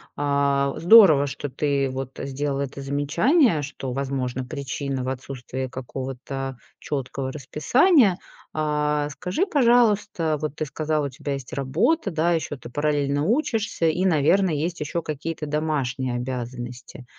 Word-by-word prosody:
А, 140 -1 +1
здорово, 170 -7 +7
что 140 +1 -5
ты 140 -1 0
вот 130 0 -5
сделал 140 +1 -2
это 140 0 -5
замечание, 150 - +2
что, 135 -2 -5
возможно, 130 -1 -2
причина 140 -1 -4
в 130 - -2
отсутствии 130 0 -5
какого-то 130 +1 -6 0.2
чёткого 135 -1 -4
расписания. 195 - +3 0.4
А, 150 -1 0
скажи, 180 - -1
пожалуйста, 210 - +3
вот 150 -1 -4
ты 155 - -2
сказал, 155 +1 -1
у - - -2
тебя 140 +1 -5
есть 135 -2 -7
работа, 175 - +1
да, 165 +2 +1
ещё 160 -2 -2
ты 120 - -11
параллельно 145 0 0
учишься 220 - 0
и, 180 +4 +1
наверно, 180 +3 +3
есть 165 +4 -2
ещё 150 +3 -2
какие-то 155 +1 -4
домашние 135 -5 -1
обязанности. 125 0 -6
145 Hz, 135 wpm, -24 LUFS, 135-160 Hz, 0.4 s, здорово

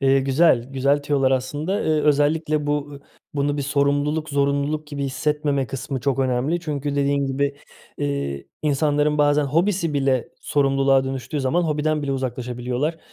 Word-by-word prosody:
Eee, 135 0 +4
güzel, 135 -2 +3
güzel 140 +2 +1
tüyolar 140 -2 +1
aslında. 145 +9 -1
Eee, - - +1
özellikle 150 +1 +2
bu 145 -1 -2 0.3
bunu 145 0 0
bir 145 - -1
sorumluluk, 145 +2 0
zorunluluk 140 +2 0
gibi 145 -1 -4
hissetmeme 140 +1 -1
kısmı 135 0 -4
çok 135 +1 0
önemli. 135 +6 0
Çünkü 145 -3 -3
dediğin 140 0 +1
gibi, 140 +1 -1 0.4
eee, 70 -1 -3 0.2
insanların 150 0 +1
bazen 145 0 +3
hobisi 165 +2 +1
bile 135 -3 +1
sorumluluğa 135 -1 +2
dönüştüğü 135 +3 -3
zaman 145 +7 +1
hobiden 150 -1 0
bile 140 -1 -1
uzaklaşabiliyorlar. 125 +4 -3
140 Hz, 140 wpm, -22 LUFS, 135-150 Hz, 0.4 s, Eee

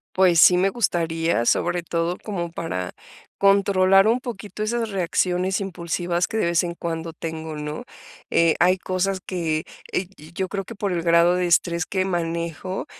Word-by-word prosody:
Pues, 185 -3 +4
sí 180 +2 +8
me 185 +2 +3
gustaría, 165 - 0
sobre 175 +7 +1
todo 170 +1 -1
como 175 -5 -3
para 165 - -4 0.4
controlar 195 0 +4
un 235 +3 +2
poquito 215 -3 -6
esas 230 +1 -1
reacciones 185 0 0
impulsivas 175 -1 -2
que 220 - -3
de - - +1
vez 170 0 +2
en 170 -1 -3
cuando 165 -1 -4
tengo, 160 -1 -6
¿no?, 150 0 -5 0.5
eh, 165 -1 +3
hay 180 +2 +4
cosas 185 +1 -1
que 165 -4 -2 0.3
eh, 185 - -1
yo 155 +1 -14
yo 190 +2 -2
creo 195 +1 -4
que 230 - -9
por 200 -2 -2
el 170 - -1
grado 170 +1 +4
de 180 0 0
estrés 170 0 +2
que 190 -1 -1
manejo, 170 0 -3
175 Hz, 170 wpm, -23 LUFS, 165-195 Hz, 0.5 s, sí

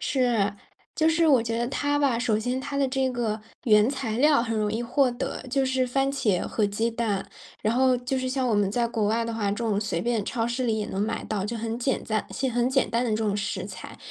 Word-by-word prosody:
是， 235 -7 +1 0.4
就 315 0 +3
是 325 0 +3
我 265 -4 +6
觉 230 0 -2
得 240 0 -1
它 290 +2 0
吧， 265 -5 +2
首 230 -3 +1
先 250 +4 -1
它 280 +1 -5
的 275 -1 +2
这 265 0 0
个， 220 -3 -2 0.2
原 210 0 +5
材 260 -5 -2
料 290 -3 +5
很 225 -2 -2
容 210 - +1
易 225 +2 -1
获 260 +2 +2
得， 240 - -4
就 270 +1 +1
是 260 -1 +1
番 270 +2 +1
茄 225 -10 +1
和 215 -2 0
鸡 220 +3 -1
蛋， 215 -4 -1 0.4
然 215 - +1
后 255 +1 +3
就 255 +2 -2
是 255 0 -2
像 260 -1 0
我 - - +1
们 205 -2 +2
在 235 +3 0
国 220 -3 0
外 230 +2 +1
的 230 - -3
话， 215 -3 -1
这 205 - -4
种 215 -3 0
随 200 -6 -2
便 230 -4 0
超 230 -1 -1
市 240 +2 -1
里 225 -2 +1
也 - - -2
能 190 - -3
买 220 +2 -1
到， 200 -2 -3
就 230 +2 -3
很 225 +1 -3
简 265 +2 0
单 215 -1 -2
些 265 -1 -2
很 240 +1 +1
简 265 +1 +1
单 235 +2 +1
的 235 - -1
这 - - +2
种 210 -2 0
食 200 -1 -3
材， - - -9
235 Hz, 275 characters per minute, -26 LUFS, 220-260 Hz, 0.4 s, 我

